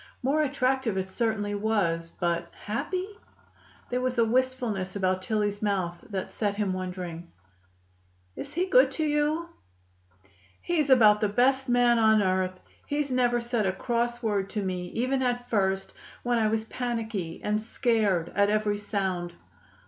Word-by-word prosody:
More 285 +4 +2
attractive 260 -6 0
it 190 0 -3
certainly 220 -3 -1
was, 200 -6 0
but 170 0 -2 0.2
happy? 360 - -2 0.9
There 250 0 0
was 255 0 -1
a 230 - +4
wistfulness 235 -6 0
about 185 -1 0
Tillie's 205 0 -1
mouth 185 -5 -1
that 195 -3 -4
set 205 -2 -1
him 200 -2 0
wondering. 180 -2 -5 1.0
"Is 280 - -6
he 360 +2 +1
good - - +5
to 315 - -1
you?" 300 +3 0 1.1
"He's 310 -5 0
about 215 -5 +6
the 210 - +2
best 260 +5 +2
man 245 -1 +4
on 220 -1 +5
earth. 185 0 0 0.3
He's 290 -1 -1
never 245 -1 +2
said 235 -3 -1
a - - +2
cross 240 +4 -2
word 200 -3 0
to 210 0 -3
me 180 -1 -3
even 255 +6 -1
at 245 -1 -1
first, 195 -2 0 0.3
when 240 -1 +1
I 220 - +3
was 220 0 0
panicky 225 -8 -3
and 210 +1 0
scared 215 -7 +1
at 200 +1 +3
every 210 -1 +1
sound." 190 -4 -2
215 Hz, 150 wpm, -27 LUFS, 190-245 Hz, 1.1 s, about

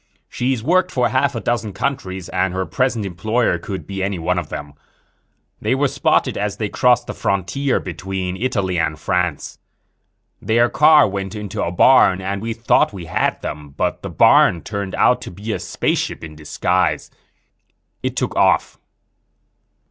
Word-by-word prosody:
She's 125 -2 -2
worked 180 +5 +2
for 125 -7 +1
half 130 +1 +1
a - - -1
dozen 110 -3 -2
countries 95 -10 -3
and 95 0 -1
her 95 0 -1
present 125 -3 -1
employer 100 +2 0
could 95 +2 -6
be 95 -1 -5
any 95 0 -1
one 90 +2 0
of 85 - -7
them. 75 0 -7 0.9
They 110 +5 +1
were 140 +2 +2
spotted - - +1
as 105 -1 -2
they 105 -2 -2
crossed 125 +1 +3
the - - -5
frontier 100 +9 -1
between 90 +1 -4
Italy 95 -5 -1
and 80 -1 -1
France. 90 -1 -2 0.8
Their 120 +2 +2
car 155 +1 +6
went 95 +1 -4
into 105 -2 -5
a 85 - -2
barn 95 -1 +5
and 95 +1 -3
we 115 +1 -3
thought 115 +1 +2
we 95 -4 -8
had 80 - -1
them. 75 -2 -7
But - - -1
the - - -6
barn 85 -3 +4
turned 100 0 -4
out - - +3
to - - -7
be 105 +4 -5
a - - -3
spaceship - - -2
in 80 -1 -9
disguise. 75 -1 -1 0.9
It - - -3
took - - -2
off." - - +2
100 Hz, 165 wpm, -20 LUFS, 90-120 Hz, 0.9 s, car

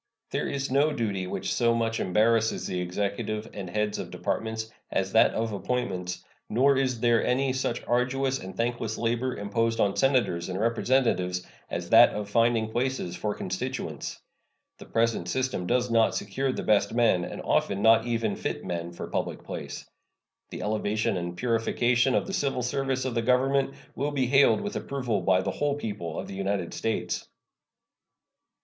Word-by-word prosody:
There - - -1
is 135 -1 -3
no 145 +3 +3
duty 100 -8 -2
which - - -2
so 115 -1 +3
much 115 -1 0
embarrasses 110 +4 +2
the 90 -1 -2
Executive 100 +4 -2
and 95 -3 -6
heads 105 +2 -1
of - - -5
Departments 110 0 -3 0.2
as - - -1
that - - +5
of 110 -1 -1
appointments, 95 -5 -3 0.3
nor 135 +5 +4
is 130 -4 0
there 120 -1 +3
any 130 +1 +1
such 130 -2 -2
arduous 130 +2 +1
and 95 0 -9
thankless 115 -2 -1
labor 120 +2 -1
imposed 115 +3 0
on 100 -1 +2
Senators 125 -11 +1
and 95 +1 -3
Representatives 115 -6 +1 0.2
as - - -4
that - - +8
of 105 -1 -4
finding 115 -1 +2
places 120 -7 -1
for 105 +3 -2
constituents. - - -4 0.6
The - - -11
present 115 -6 0
system 130 -6 -1
does 125 0 +1
not 115 -1 +3
secure 130 +7 -1
the - - -4
best 105 +1 +2
men, 110 -7 +3
and - - -6
often 100 +1 0
not 115 +1 +5
even 115 -3 0
fit - - -4
men, 85 -1 -4
for - - -6
public - - -3
place. - - -7 0.6
The - - -6
elevation 105 0 0
and 85 0 -4
purification 120 +2 +2
of - - +1
the 195 - -6
civil 135 -7 0
service 135 0 -1
of 130 - -1
the 115 - +1
Government 135 +3 +2 0.2
will 140 +3 -1
be 140 -3 0
hailed 135 +9 +5
with 205 0 -4
approval 125 -7 -2
by 90 +1 +3
the - - -1
whole 145 -1 0
people 100 - -5
of - - -4
the - - -7
United 95 -2 -2
States. 115 -1 -2
115 Hz, 170 wpm, -27 LUFS, 100-130 Hz, 0.6 s, that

